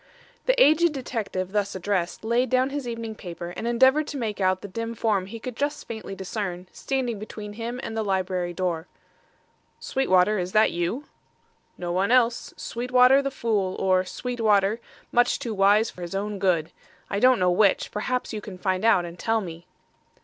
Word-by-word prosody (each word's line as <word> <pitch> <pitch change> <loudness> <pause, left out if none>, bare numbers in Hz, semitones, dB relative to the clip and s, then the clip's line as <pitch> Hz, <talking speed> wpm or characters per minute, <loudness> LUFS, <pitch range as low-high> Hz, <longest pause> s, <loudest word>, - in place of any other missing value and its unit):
The - - +3
aged 335 -6 +5
detective, 215 -8 -3
thus 205 -1 -1
addressed, 185 -1 -2
laid 235 +3 +1
down 255 +1 +2
his 280 -3 -4
evening 230 -1 -4
paper 175 -4 -7
and 225 - -5
endeavoured 260 +5 +4
to 290 - -5
make 215 -5 -3
out 185 0 +2
the - - -5
dim 230 +4 -5
form 205 -4 0
he 230 +3 -8
could 250 +1 -6
just 290 +3 -2
faintly 220 -3 -6
discern 190 -2 -4
standing 250 -5 -2
between 210 0 -8
him 235 +3 -5
and 225 - -5
the 220 - 0
library 185 -3 -1
door. 175 -2 -2 0.9
"Sweetwater, 210 -5 +2
is 180 +1 -3
that 215 0 +5
you?" 175 +11 -2 0.7
"No 175 -1 -4
one 185 +3 +1
else. 245 -2 +2
Sweetwater, 250 +3 +3
the 275 - -1
fool, 210 -8 -1
or 185 -1 +2
Sweetwater, 220 -1 0 0.3
much 245 0 +3
too 230 - -4
wise 205 +3 +4
for 180 - -12
his 175 +2 -5
own 205 +1 -3
good. 175 -5 +1 0.4
I 200 - -2
don't 255 +2 +5
know 180 -1 +2
which. 195 +2 +3
Perhaps 250 +4 -2
you 215 - -4
can 200 -3 -9
find 185 +1 -1
out 200 -6 +4
and 170 0 -9
tell 225 0 +1
me." 170 -4 -8
210 Hz, 180 wpm, -25 LUFS, 185-240 Hz, 0.9 s, aged